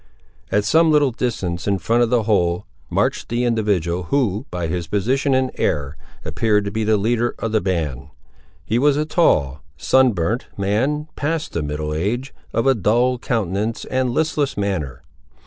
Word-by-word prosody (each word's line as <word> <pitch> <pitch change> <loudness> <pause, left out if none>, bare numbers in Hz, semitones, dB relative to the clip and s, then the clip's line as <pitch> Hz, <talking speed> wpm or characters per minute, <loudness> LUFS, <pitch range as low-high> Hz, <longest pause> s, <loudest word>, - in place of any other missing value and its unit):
At 105 0 +2
some 160 +7 +4
little 145 -3 +4
distance 105 -8 -3
in 100 -1 +2
front 115 +5 +1
of 120 - +3
the 120 -2 +2
whole, 90 -5 +1 0.2
marched - - 0
the 120 +1 0
individual, 100 -7 0
who, 115 - 0
by 90 -1 -3
his 85 0 -3
position 130 - +1
and 130 0 +1
air, 70 0 -1 0.3
appeared 105 -2 +1
to 100 - -3
be 110 +1 -1
the 110 0 +3
leader 120 +3 0
of 115 - -3
the 110 -1 +2
band. 75 -7 -2 0.6
He 115 +3 +1
was 145 +1 +3
a 150 - 0
tall, 75 - +2 0.2
sun 130 -2 +3
burnt, 100 +8 -1
man, 130 +10 0
past 155 +2 -2
the 85 - -1
middle 75 +1 -3
age, 115 - -2 0.2
of 115 - 0
a 135 - +5
dull 120 +4 +1
countenance 110 -1 -2
and 130 -1 0
listless 150 +2 0
manner. 95 -10 -2
110 Hz, 170 wpm, -20 LUFS, 90-130 Hz, 0.6 s, a